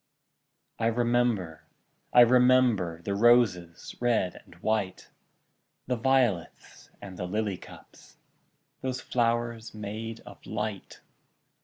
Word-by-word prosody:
I 115 Hz, -, +1 dB
remember, 120 Hz, -7 st, 0 dB, 0.5 s
I 125 Hz, -, +7 dB
remember, 120 Hz, -8 st, +4 dB
The 100 Hz, -, -2 dB
roses, 100 Hz, -6 st, +2 dB
red 115 Hz, -7 st, +1 dB
and -, -, -18 dB
white, 110 Hz, -4 st, -2 dB, 0.8 s
The 125 Hz, -, -1 dB
violets, 120 Hz, -7 st, -1 dB
and 95 Hz, -2 st, -9 dB
the 90 Hz, -, -4 dB
lily 105 Hz, 0 st, -2 dB
cups, -, -, -16 dB, 0.6 s
Those 130 Hz, -1 st, -3 dB
flowers 115 Hz, -2 st, -1 dB
made 110 Hz, +2 st, -6 dB
of -, -, -14 dB
light! 105 Hz, -1 st, -5 dB
115 Hz, 105 wpm, -28 LUFS, 100-120 Hz, 0.8 s, I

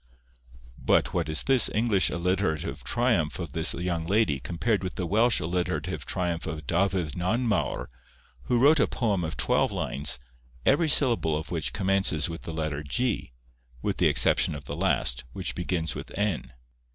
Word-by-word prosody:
But -, -, +2 dB
what -, -, -1 dB
is 80 Hz, -, +1 dB
this 130 Hz, -4 st, +3 dB
English 110 Hz, -4 st, +3 dB
alliterative 90 Hz, -2 st, -1 dB
triumph 115 Hz, -, +1 dB
of 85 Hz, -5 st, -6 dB
the 80 Hz, +2 st, 0 dB
young 85 Hz, -2 st, -2 dB
lady 100 Hz, -8 st, +2 dB
compared 95 Hz, -, -1 dB
with 90 Hz, -, -4 dB
the 90 Hz, -, -2 dB
Welsh 115 Hz, +7 st, +3 dB
alliterative 90 Hz, -1 st, -2 dB
triumph 85 Hz, -3 st, -2 dB
of 80 Hz, -1 st, -5 dB
Dafydd 90 Hz, -2 st, 0 dB
Nanmawr, 100 Hz, -, 0 dB, 0.6 s
who 120 Hz, -, +1 dB
wrote 145 Hz, +5 st, +5 dB
a -, -, +3 dB
poem 105 Hz, -7 st, -1 dB
of 80 Hz, -, -4 dB
twelve -, -, +1 dB
lines, 70 Hz, -3 st, 0 dB, 0.5 s
every 155 Hz, +3 st, +3 dB
syllable 115 Hz, -, +2 dB
of 80 Hz, +3 st, -7 dB
which 75 Hz, -7 st, 0 dB
commences 95 Hz, -2 st, +1 dB
with 85 Hz, 0 st, -6 dB
the -, -, -6 dB
letter 80 Hz, -2 st, -3 dB
g, 105 Hz, -, -2 dB, 0.5 s
with -, -, -1 dB
the -, -, +4 dB
exception -, -, +3 dB
of 70 Hz, -1 st, -8 dB
the -, -, -5 dB
last, 60 Hz, 0 st, +1 dB
which -, -, -3 dB
begins 85 Hz, -2 st, -2 dB
with -, -, -7 dB
n? 100 Hz, -10 st, -1 dB
90 Hz, 165 wpm, -27 LUFS, 80-105 Hz, 0.6 s, wrote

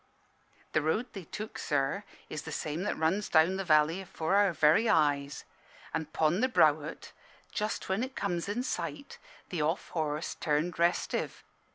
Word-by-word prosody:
"The 155 Hz, -, +2 dB
road 210 Hz, +11 st, -1 dB
they 195 Hz, -4 st, -7 dB
took, 215 Hz, +7 st, -6 dB
sir, 145 Hz, +7 st, 0 dB, 0.2 s
is 155 Hz, -, -5 dB
the -, -, -8 dB
same 155 Hz, +2 st, -3 dB
that 210 Hz, -, -1 dB
runs 180 Hz, +6 st, +1 dB
down 165 Hz, +4 st, +4 dB
the 195 Hz, -, -2 dB
valley 160 Hz, +1 st, +3 dB
afore 180 Hz, -2 st, -3 dB
our 200 Hz, -1 st, +5 dB
very 160 Hz, +8 st, +4 dB
eyes. 145 Hz, -2 st, +2 dB, 0.5 s
An' 160 Hz, -, -1 dB
'pon 155 Hz, +4 st, +1 dB
the 255 Hz, +2 st, +2 dB
brow 160 Hz, -, +6 dB
o't, 155 Hz, -, -8 dB, 0.4 s
just 210 Hz, +1 st, -2 dB
when 190 Hz, +3 st, 0 dB
it 260 Hz, +1 st, -5 dB
comes 180 Hz, -1 st, -2 dB
in 235 Hz, +5 st, -1 dB
sight, 170 Hz, -, -4 dB, 0.3 s
the 175 Hz, -4 st, -2 dB
off 160 Hz, +5 st, -1 dB
horse 155 Hz, -1 st, -2 dB
turned 155 Hz, +3 st, -1 dB
restive. 170 Hz, +1 st, 0 dB
170 Hz, 170 wpm, -30 LUFS, 155-200 Hz, 0.5 s, brow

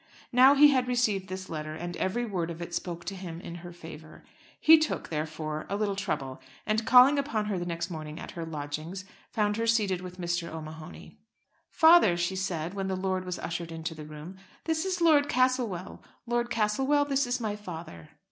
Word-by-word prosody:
Now 260 Hz, +3 st, +7 dB
he 295 Hz, +1 st, +8 dB
had 260 Hz, -3 st, +2 dB
received 215 Hz, -7 st, 0 dB
this 185 Hz, 0 st, -6 dB
letter, 155 Hz, -1 st, -5 dB
and 175 Hz, +2 st, -5 dB
every 240 Hz, +6 st, -1 dB
word 180 Hz, -6 st, -2 dB
of 165 Hz, -1 st, -7 dB
it 170 Hz, 0 st, -7 dB
spoke 175 Hz, -1 st, -4 dB
to 190 Hz, -, -4 dB
him 175 Hz, -3 st, -7 dB
in 170 Hz, -1 st, -8 dB
her 175 Hz, 0 st, -9 dB
favour. 160 Hz, -2 st, -12 dB, 0.4 s
He 320 Hz, 0 st, +8 dB
took, 310 Hz, -, -2 dB
therefore, 155 Hz, 0 st, -4 dB
a 200 Hz, -, -1 dB
little 205 Hz, -1 st, -1 dB
trouble, 140 Hz, -9 st, -3 dB, 0.2 s
and 220 Hz, +1 st, 0 dB
calling 260 Hz, +3 st, +7 dB
upon 230 Hz, -7 st, -1 dB
her 205 Hz, -3 st, -2 dB
the 175 Hz, -, -4 dB
next 170 Hz, +1 st, -3 dB
morning 155 Hz, -1 st, -6 dB
at -, -, -8 dB
her 170 Hz, -, -6 dB
lodgings, 155 Hz, +4 st, -5 dB, 0.2 s
found 210 Hz, -2 st, 0 dB
her 230 Hz, 0 st, -1 dB
seated 205 Hz, -5 st, +2 dB
with 180 Hz, 0 st, -9 dB
Mr. 175 Hz, -1 st, -2 dB
O'Mahony. 155 Hz, 0 st, -9 dB, 0.5 s
"Father," 320 Hz, -, +6 dB
she 175 Hz, +2 st, -1 dB
said, 180 Hz, -3 st, -3 dB
when 195 Hz, -1 st, -3 dB
the 190 Hz, -, -1 dB
lord 185 Hz, 0 st, -2 dB
was 180 Hz, -1 st, -4 dB
ushered 170 Hz, 0 st, -5 dB
into 165 Hz, 0 st, -5 dB
the 155 Hz, -1 st, -9 dB
room, 155 Hz, +5 st, -9 dB, 0.3 s
"this 320 Hz, +1 st, -1 dB
is 370 Hz, -2 st, -2 dB
Lord 300 Hz, -4 st, +5 dB
Castlewell. 245 Hz, -8 st, 0 dB, 0.2 s
Lord 240 Hz, 0 st, -1 dB
Castlewell, 265 Hz, +7 st, +2 dB
this 275 Hz, -2 st, +1 dB
is 245 Hz, +1 st, -1 dB
my 215 Hz, -3 st, -2 dB
father." 165 Hz, -, -9 dB
185 Hz, 195 wpm, -28 LUFS, 165-240 Hz, 0.5 s, he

